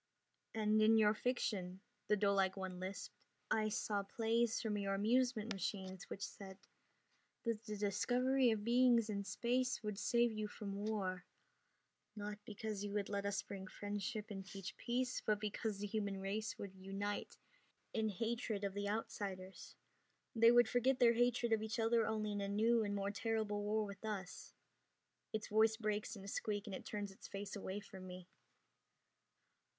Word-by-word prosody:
"And 215 Hz, 0 st, +3 dB
in 220 Hz, +1 st, +7 dB
your 210 Hz, -1 st, +6 dB
fiction," 205 Hz, -6 st, -1 dB, 0.3 s
the 210 Hz, 0 st, +4 dB
doelike 195 Hz, -1 st, +3 dB
one 190 Hz, -1 st, -4 dB
lisped, 190 Hz, +2 st, -5 dB, 0.4 s
"I 215 Hz, -1 st, +3 dB
saw 205 Hz, -1 st, 0 dB
plays 225 Hz, +3 st, +1 dB
from 210 Hz, -3 st, -1 dB
your 195 Hz, -1 st, 0 dB
amusement 230 Hz, +1 st, +2 dB
machines 190 Hz, -1 st, -4 dB
which 200 Hz, -, -5 dB
said 190 Hz, -2 st, -9 dB, 0.9 s
that 230 Hz, -2 st, -1 dB
the 215 Hz, -1 st, -4 dB
discovery 250 Hz, +5 st, +3 dB
of 220 Hz, -2 st, +1 dB
beings 235 Hz, -1 st, +5 dB
in 200 Hz, -1 st, -1 dB
space 245 Hz, +6 st, 0 dB
would 210 Hz, -2 st, -3 dB
save 235 Hz, 0 st, +3 dB
you 215 Hz, -1 st, -2 dB
from 205 Hz, 0 st, -4 dB
war, 185 Hz, -4 st, -1 dB, 0.9 s
not 210 Hz, 0 st, -5 dB
because 215 Hz, -1 st, -4 dB
you 205 Hz, -1 st, -3 dB
would 205 Hz, -1 st, -1 dB
let 200 Hz, 0 st, -1 dB
us 200 Hz, 0 st, 0 dB
bring 190 Hz, -1 st, -7 dB
friendship 205 Hz, +2 st, -4 dB
and 195 Hz, -1 st, -4 dB
teach 195 Hz, 0 st, -7 dB
peace, 250 Hz, +1 st, -1 dB
but 210 Hz, -1 st, +2 dB
because 210 Hz, 0 st, -2 dB
the 205 Hz, -, -3 dB
human 200 Hz, -2 st, -1 dB
race 205 Hz, +3 st, -2 dB
would 200 Hz, -2 st, -6 dB
unite 195 Hz, +2 st, -4 dB, 0.6 s
in 220 Hz, -1 st, +1 dB
hatred 220 Hz, 0 st, -2 dB
of 200 Hz, -1 st, -1 dB
the 205 Hz, 0 st, -2 dB
outsiders. 195 Hz, -3 st, -4 dB, 0.6 s
They 230 Hz, +1 st, +8 dB
would 240 Hz, -1 st, +7 dB
forget 245 Hz, +3 st, +3 dB
their 240 Hz, -2 st, +6 dB
hatred 240 Hz, 0 st, +3 dB
of 220 Hz, -, +2 dB
each 220 Hz, -1 st, -2 dB
other 225 Hz, 0 st, +3 dB
only 215 Hz, -1 st, 0 dB
in 205 Hz, 0 st, -2 dB
a 200 Hz, -, -1 dB
new 225 Hz, +3 st, +3 dB
and 205 Hz, -1 st, -1 dB
more 200 Hz, 0 st, -1 dB
terrible 215 Hz, -1 st, -1 dB
war 210 Hz, +1 st, +1 dB
with 200 Hz, +1 st, -8 dB
us." 200 Hz, -4 st, -5 dB, 0.8 s
Its 220 Hz, 0 st, -2 dB
voice 220 Hz, +1 st, +4 dB
breaks 215 Hz, 0 st, -1 dB
in 195 Hz, -, -9 dB
a -, -, -8 dB
squeak 205 Hz, 0 st, -2 dB
and 205 Hz, -, -6 dB
it -, -, -6 dB
turns 205 Hz, -1 st, -3 dB
its 195 Hz, -, -11 dB
face 200 Hz, +1 st, -5 dB
away 200 Hz, 0 st, -4 dB
from 190 Hz, -2 st, -10 dB
me. 180 Hz, -1 st, -8 dB
210 Hz, 170 wpm, -39 LUFS, 200-225 Hz, 0.9 s, They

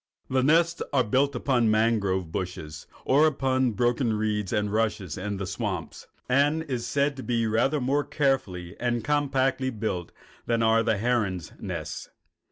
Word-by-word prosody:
The 130 Hz, 0 st, +3 dB
nest 165 Hz, +5 st, +3 dB
is 135 Hz, -3 st, +3 dB
built 140 Hz, +1 st, +2 dB
upon 125 Hz, -1 st, +1 dB
the -, -, +3 dB
mangrove 105 Hz, -6 st, +1 dB
bushes 80 Hz, -4 st, -5 dB, 0.2 s
or 145 Hz, +4 st, +5 dB
upon 130 Hz, -3 st, +1 dB
the 115 Hz, -, -2 dB
broken 120 Hz, +1 st, +1 dB
reeds 105 Hz, -2 st, -1 dB
and 105 Hz, 0 st, 0 dB
rushes 105 Hz, -6 st, -1 dB
in 100 Hz, +1 st, -4 dB
the 95 Hz, -, -3 dB
swamps, 90 Hz, -3 st, -4 dB, 0.2 s
and 145 Hz, +5 st, +2 dB
is 125 Hz, -6 st, -3 dB
said 140 Hz, +3 st, +1 dB
to -, -, -5 dB
be 120 Hz, -2 st, 0 dB
rather 120 Hz, +7 st, +1 dB
more 140 Hz, +3 st, +1 dB
carefully 100 Hz, -, -1 dB
and 120 Hz, -2 st, -1 dB
compactly 135 Hz, -1 st, +1 dB
built 105 Hz, -7 st, -3 dB, 0.4 s
than 115 Hz, -1 st, +1 dB
are 110 Hz, 0 st, +4 dB
the 110 Hz, -2 st, +1 dB
herons' 100 Hz, -7 st, -1 dB
nests. -, -, -5 dB
120 Hz, 165 wpm, -26 LUFS, 105-135 Hz, 0.4 s, or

